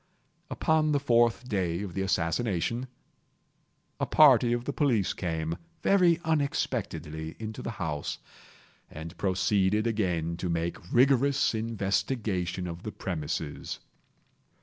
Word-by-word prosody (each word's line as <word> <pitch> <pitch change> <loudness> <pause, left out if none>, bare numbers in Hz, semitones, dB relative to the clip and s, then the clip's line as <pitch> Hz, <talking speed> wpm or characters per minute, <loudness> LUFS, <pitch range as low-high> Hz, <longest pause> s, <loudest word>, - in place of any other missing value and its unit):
Upon 155 -1 +2
the 145 - +3
fourth 120 -2 +2
day 95 -4 -1
of 95 -4 -6
the 95 - -2
assassination, 95 +6 0 1.1
a - - 0
party 130 -6 +6
of 120 0 -1
the 140 - -2
police 120 - +1
came, 80 -2 -3 0.3
very 180 -4 +4
unexpectedly, 100 - -2
into 110 -1 -6
the - - -4
house, 75 -4 -3 0.7
and 80 +3 -8
proceeded 95 +2 +2
again 90 -7 0
to 90 - -3
make 85 0 -1
rigorous 135 +2 +4
investigation 100 -4 -1
of 85 -1 -6
the 110 - -5
premises. 80 -6 -4
100 Hz, 115 wpm, -28 LUFS, 85-125 Hz, 1.1 s, party